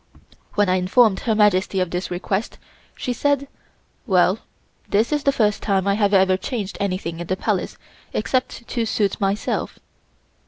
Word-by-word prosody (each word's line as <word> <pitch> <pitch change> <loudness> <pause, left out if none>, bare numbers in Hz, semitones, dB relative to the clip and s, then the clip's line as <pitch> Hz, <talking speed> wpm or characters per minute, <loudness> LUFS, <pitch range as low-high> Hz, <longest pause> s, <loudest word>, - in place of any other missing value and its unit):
When 205 -1 +3
I 185 0 +3
informed 195 +3 +3
Her 225 -3 0
Majesty 200 -2 +3
of 185 -2 -1
this 180 +1 -3
request, 190 +4 -3 0.4
she 250 - -3
said: 280 +2 0 0.6
"Well, 185 +1 +3 0.5
this 220 +8 +2
is 295 - +1
the 280 - +3
first 210 -6 +1
time 195 -2 0
I 200 - +3
have 205 -1 +2
ever 190 -1 +4
changed 205 -1 -4
anything 185 -4 -2
in 175 - -5
the 185 - -1
Palace - - -2 0.3
except 255 -2 -2
to 235 -2 -1
suit 205 -3 0
myself. 195 +1 -1
200 Hz, 160 wpm, -22 LUFS, 185-225 Hz, 0.6 s, ever